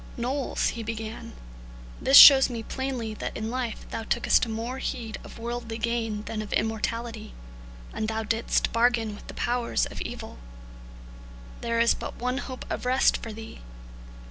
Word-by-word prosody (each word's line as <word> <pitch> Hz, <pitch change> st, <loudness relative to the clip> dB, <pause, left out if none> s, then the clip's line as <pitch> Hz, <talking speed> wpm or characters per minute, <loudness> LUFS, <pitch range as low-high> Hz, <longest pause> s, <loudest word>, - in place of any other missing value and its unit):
"Knowles," 255 Hz, +3 st, -1 dB
he 230 Hz, -, -5 dB
began, 225 Hz, 0 st, -6 dB, 0.7 s
"this 270 Hz, +1 st, +7 dB
shows 270 Hz, -2 st, +11 dB
me 230 Hz, -2 st, -5 dB
plainly 255 Hz, -3 st, -4 dB
that -, -, -5 dB
in 220 Hz, +1 st, -4 dB
life 245 Hz, -3 st, -4 dB
thou -, -, -3 dB
tookest 235 Hz, +2 st, +2 dB
more 230 Hz, +4 st, -4 dB
heed 225 Hz, -4 st, -4 dB
of -, -, -11 dB
worldly 230 Hz, -1 st, -5 dB
gain 225 Hz, -2 st, -2 dB
than 215 Hz, 0 st, -4 dB
of 210 Hz, -, -8 dB
immortality, 225 Hz, 0 st, -2 dB, 0.6 s
and 215 Hz, -, -2 dB
thou 220 Hz, 0 st, -2 dB
didst 225 Hz, +1 st, 0 dB
bargain 230 Hz, -2 st, +2 dB
with 205 Hz, -, -12 dB
the -, -, -9 dB
powers 240 Hz, 0 st, 0 dB
of -, -, -8 dB
evil. -, -, -7 dB, 1.2 s
There 230 Hz, 0 st, -1 dB
is 235 Hz, 0 st, +5 dB
but -, -, -7 dB
one 250 Hz, +2 st, -2 dB
hope 255 Hz, -2 st, -7 dB
of -, -, -4 dB
rest 255 Hz, +1 st, +3 dB
for 225 Hz, -, -6 dB
thee. 225 Hz, +1 st, -9 dB
230 Hz, 160 wpm, -26 LUFS, 220-245 Hz, 1.2 s, shows